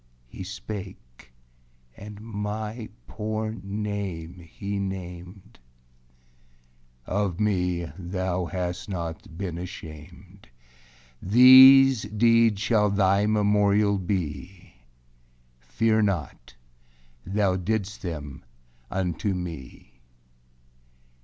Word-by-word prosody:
He - - -9
spake, 95 - -9 0.6
and 105 0 -10
my 110 +1 -5 0.2
poor 110 - -4
name 100 -4 -4
he 100 +4 -6
named, 90 -1 -7 1.5
âOf 95 -3 -1
me 90 -5 0
thou 90 0 -2
hast 90 +3 -4
not 85 0 -6
been 90 -3 -4
ashamed. 80 -8 -11 0.7
These 130 +3 +8
deeds 115 0 +3
shall 110 -2 +2
thy 100 +1 +2
memorial 105 -1 +2
be; 90 -1 -5 0.9
Fear 110 - +1
not, 85 - -3 0.7
thou 100 +1 0
didst 105 +2 -3
them 75 -7 -7 0.5
unto 95 +1 -2
me. 80 -8 -9
100 Hz, 80 wpm, -25 LUFS, 90-105 Hz, 1.5 s, These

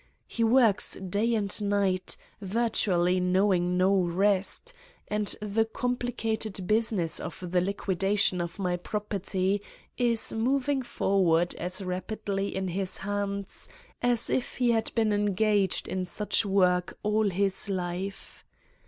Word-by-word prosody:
He 230 - -2
works 225 -3 +4
day 205 +5 -1
and 200 -2 0
night, 200 -2 0 0.2
virtually 190 -4 +1
knowing 180 -1 +2
no 185 +2 +3
rest, 195 - 0 0.3
and 210 0 -1 0.2
the 210 +2 +1
com 245 +3 -2
plicated 220 -5 -3
business 210 -6 +1
of - - -7
the 180 -1 +3
liquidation 195 0 0
of 170 -1 -5
my 180 -3 -1
prop 210 +4 -5
erty 195 0 -1 0.4
is 235 -2 +1
moving 265 +4 +1
forward 185 -7 +1
as 180 +3 -4
rapidly 195 +2 -3
in 190 -1 -2
his 185 +1 -2
hands 200 -1 -4 0.3
as 245 -1 +4
if 255 - -1
he 245 -2 +3
had 225 -1 0
been 220 -2 +2
engaged 205 -1 +1
in 185 -1 -3
such 210 +3 +1
work 180 -2 +2
all 210 0 +2
his 195 +2 0
life. 185 +1 -5
200 Hz, 130 wpm, -28 LUFS, 185-220 Hz, 0.4 s, works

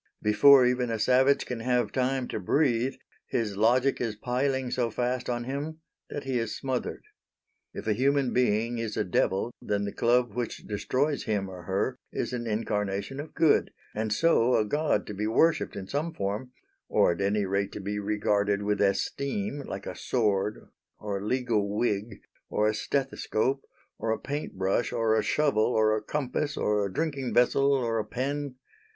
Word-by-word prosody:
Before 125 +5 +7
even 125 0 +1
a 115 - -1
savage 130 +5 +3
can 125 -2 -4
have 120 -2 +1
time 130 0 0
to - - -3
breathe, 130 -3 +1 0.3
his 110 -4 -1
logic 125 +6 +3
is 115 -3 -1
piling 130 +3 -1
so 120 -2 0
fast 125 +3 -2
on 120 -1 -1
him 145 +5 -5 0.3
that 145 - -5
he 130 -2 -1
is 115 -1 -3
smothered. 130 -2 -3 0.7
If - - -6
a 110 - +2
human 135 +3 +1
being 120 -1 +1
is 110 -2 -3
a - - +2
devil 95 +5 0
then 100 0 -1
the 100 - -3
club 120 -1 +2
which 120 0 -4
destroys 135 +8 -1
him 105 -3 -1
or 90 -2 -9
her 100 +7 -1
is - - -3
an 120 -1 -3
incarnation 105 +2 -2
of 150 +2 -8
good, 160 -3 +4 0.2
and 110 0 -2
so 125 -1 +3
a 110 - +3
god 145 -2 0
to - - -6
be 105 +2 -2
worshipped 160 +9 +2
in 100 -2 -5
some 155 +6 -2
form 105 +6 -3 0.4
or - - +4
at 85 - -3
any 100 +1 +1
rate 100 +1 -1
to - - -5
be 105 +1 -3
regarded 105 0 +1
with 105 0 0
esteem, 140 - -1
like - - -6
a - - -5
sword, 105 -4 0 0.3
or 100 -2 -3
a - - -7
legal 110 -5 0
wig, 105 -2 -1 0.3
or 105 - +1
a 110 - +2
stethoscope, 135 +1 -1 0.4
or 115 - -2
a 110 - +1
paint 145 -7 -5
brush, 95 +5 0
or 115 -2 +2
a 110 - +3
shovel, 140 -4 +2
or 110 -1 +4
a 110 - -2
compass, 145 +3 -2
or 105 -1 +1
a - - -8
drinking 140 - -2
vessel, 135 +3 +4
or 120 -5 +1
a - - 0
pen. 140 +3 -3
120 Hz, 180 wpm, -28 LUFS, 105-130 Hz, 0.7 s, Before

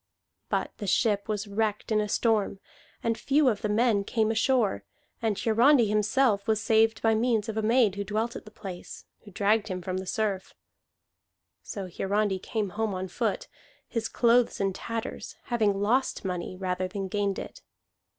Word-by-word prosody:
But - - -1
the 205 - -4
ship 205 +1 +1
was 210 0 -2
wrecked 210 +1 -2
in 215 -1 +3
a 210 - -3
storm, 210 -3 +1 0.4
and 230 0 +1
few 280 +4 +2
of 210 -4 -2
the 210 - -1
men 215 -1 +2
came 220 +1 +1
ashore; 225 - +1 0.4
and 220 -3 0
Hiarandi 240 +3 +4
himself 210 +1 +2
was 220 -1 +2
saved 225 0 +2
by 225 -1 +4
means 225 -1 +1
of 220 - -4
a 220 - 0
maid 225 -1 +3
who 200 +1 -3
dwelt 220 +3 -2
at - - -7
the 215 - -12
place, 190 -4 -9 0.2
who - - -11
dragged 205 +3 +2
him 185 -3 -3
from 185 +1 -4
the 190 0 -5
surf. 205 -3 -2 1.1
So 195 -2 -6
Hiarandi 195 +2 0
came 210 +1 -2
home 210 0 -2
on 185 0 -4
foot, - - -2 0.4
his 225 -2 -2
clothes 240 0 +3
in 195 -1 0
tatters, 230 +3 -5
having 215 -5 +1
lost 235 +3 +1
money 180 0 -3
rather 185 -1 -2
than 195 +1 -4
gained 200 0 -1
it. - - -8
215 Hz, 175 wpm, -27 LUFS, 200-225 Hz, 1.1 s, Hiarandi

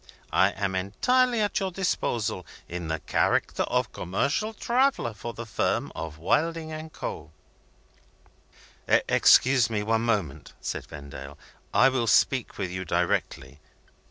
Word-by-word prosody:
I 95 +1 +5
am 95 -1 -2
entirely 235 - +2
at 205 - 0
your 195 - -1
disposal, 125 - -1 0.2
in 85 -1 -5
the 80 0 -1
character - - +1
of - - 0
commercial 140 - -1
traveller 245 - +1
for 115 +3 -7
the 115 - -6
firm 110 - -1
of 80 -2 -6
Wilding 160 - 0
and 155 0 -7
Co." - - -6 1.6
"Excuse 130 -2 +5
me 110 -2 -1
for - - -5
one 110 +1 +1
moment," 105 -11 -2
said - - -5
Vendale; 70 -1 -9 0.3
"I 135 - +5
will 125 -3 -1
speak 130 +2 +2
to 100 - -3
you 95 +1 -5
directly." 75 -3 -1
115 Hz, 135 wpm, -26 LUFS, -, 1.6 s, I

